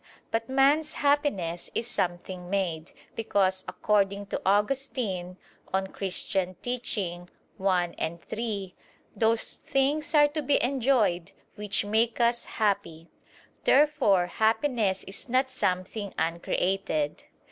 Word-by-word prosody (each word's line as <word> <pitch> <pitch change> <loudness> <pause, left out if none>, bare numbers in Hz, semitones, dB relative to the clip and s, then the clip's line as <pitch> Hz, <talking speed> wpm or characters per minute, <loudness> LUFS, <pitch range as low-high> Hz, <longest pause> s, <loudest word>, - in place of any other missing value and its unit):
But 225 +1 -1
man's 280 +4 +3
happiness 280 - 0
is 230 - 0
something 180 -4 -2
made; 175 -5 -2 0.2
because 190 -4 +1
according 200 -1 +1
to - - -1
Augustine 205 -4 0 0.3
(De 190 - +2
Doctr. 190 0 -7
Christ. 195 0 -2 1.6
i, 165 +2 -2
3): 205 -5 -4 0.4
"Those 225 0 +1
things 290 +3 0
are 295 -1 +7
to 305 +1 -3
be 290 -1 +2
enjoyed 235 -9 +1 0.2
which 210 -1 -1
make 225 +3 +1
us 235 0 +2
happy." 170 -6 -1 0.5
Therefore 270 -11 +4
happiness 220 -1 +1
is 200 +7 -6
not 260 +2 +2
something 200 -3 -2
uncreated. 165 -1 -1
205 Hz, 105 wpm, -27 LUFS, 185-260 Hz, 1.6 s, are